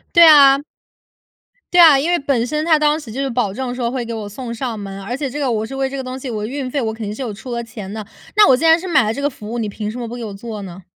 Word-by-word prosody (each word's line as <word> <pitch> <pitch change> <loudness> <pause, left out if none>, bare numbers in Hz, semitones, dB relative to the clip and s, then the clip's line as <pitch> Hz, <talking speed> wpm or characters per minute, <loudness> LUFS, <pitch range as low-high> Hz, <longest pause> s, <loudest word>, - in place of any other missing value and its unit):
对 340 0 +9
啊。 280 -3 +7 1.1
对 355 - +6
啊， 315 -5 +8
因 305 +5 -1
为 350 - +2
本 260 -4 0
身 305 +3 -2
它 320 -2 +4
当 300 +1 +2
时 255 -8 -10
就 265 +5 -5
是 275 - -1
保 235 -5 -1
证 250 +3 -4
说 240 -2 -2
会 250 -1 -3
给 230 0 -5
我 215 -2 -5
送 235 +3 -7
上 235 -2 -4
门， 195 -1 -7
而 240 +6 -4
且 280 0 -3
这 290 +3 -5
个 270 -3 0
我 220 -1 -1
是 270 - -8
为 270 0 -1
这 275 - -5
个 265 - -4
东 255 0 -6
西， 260 -1 -6
我 215 -2 -3
运 265 0 -4
费 285 - -1
我 220 -3 -2
肯 225 0 -6
定 205 - -4
是 245 - -10
有 230 -4 -4
出 250 +5 -10
了 235 0 -2
钱 215 -4 -9
的。 215 -1 -6 0.3
那 420 - +7
我 260 - +6
既 310 - -3
然 325 0 +6
是 370 - -7
买 340 -8 +4
了 215 0 0
这 280 - -5
个 285 - +1
服 215 -6 -10
务， 240 - -3
你 220 - -2
凭 210 +1 -5
什 240 - -7
么 240 - -4
不 230 - -7
给 240 -1 -6
我 205 - -6
做 215 0 -7
呢？ 185 -1 -10
245 Hz, 355 characters per minute, -19 LUFS, 220-275 Hz, 1.1 s, 对